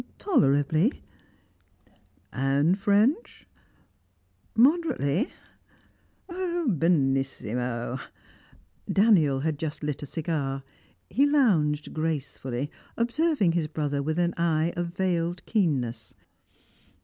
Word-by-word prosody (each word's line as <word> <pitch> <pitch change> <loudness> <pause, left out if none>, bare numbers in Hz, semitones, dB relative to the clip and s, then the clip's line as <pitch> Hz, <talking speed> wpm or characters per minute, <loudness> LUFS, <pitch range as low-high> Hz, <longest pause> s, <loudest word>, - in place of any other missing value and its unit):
"Tolerably." 155 - +2 1.3
"And 140 +8 +1
French?" 220 - +1 1.1
"Moderately." 255 - +2 1.0
"Benissimo!" 135 - -1 0.9
Daniel 170 -11 +4
had 155 -1 -2
just 155 -1 -4
lit 150 -1 -3
a 145 - -6
cigar; 140 -4 -3 0.5
he 275 +9 +3
lounged 170 - +2
gracefully, 145 -4 -3 0.3
observing 240 - +1
his 165 -2 0
brother 145 -2 -2
with 155 +3 -2
an 175 0 +1
eye 170 0 +1
of 175 -1 -2
veiled 175 -1 -2
keenness. 145 - -1
160 Hz, 80 wpm, -26 LUFS, 140-210 Hz, 1.3 s, Daniel